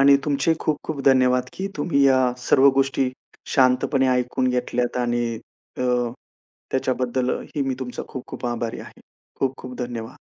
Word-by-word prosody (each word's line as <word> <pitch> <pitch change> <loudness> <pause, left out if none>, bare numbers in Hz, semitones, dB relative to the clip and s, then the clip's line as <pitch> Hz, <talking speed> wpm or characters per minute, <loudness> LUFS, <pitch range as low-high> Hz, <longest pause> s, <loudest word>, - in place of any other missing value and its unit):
आणि 140 0 +7
तुमचेही 150 +2 +1
खूप-खूप 155 -1 -2
धन्यवाद, 125 -2 +4
की 190 - -4
तुम्ही 145 -1 +1
या 130 -2 +4
सर्व 135 +2 +5
गोष्टी 135 -1 +1 0.4
शांतपणे 130 +1 +3
ऐकून 125 0 +1
घेतल्यात 125 -1 -1
आणि 120 -1 0 0.5
अ, - - -1 0.9
त्याच्याबद्दलही 130 +2 -1
मी 135 - 0
तुमचा 125 -1 -5
खूप-खूप 130 -2 -6
आभारी 120 -1 -3
आहे. - - -13 0.4
खूप-खूप 130 -1 -2
धन्यवाद. 120 -2 -5
130 Hz, 130 wpm, -23 LUFS, 125-135 Hz, 0.9 s, आणि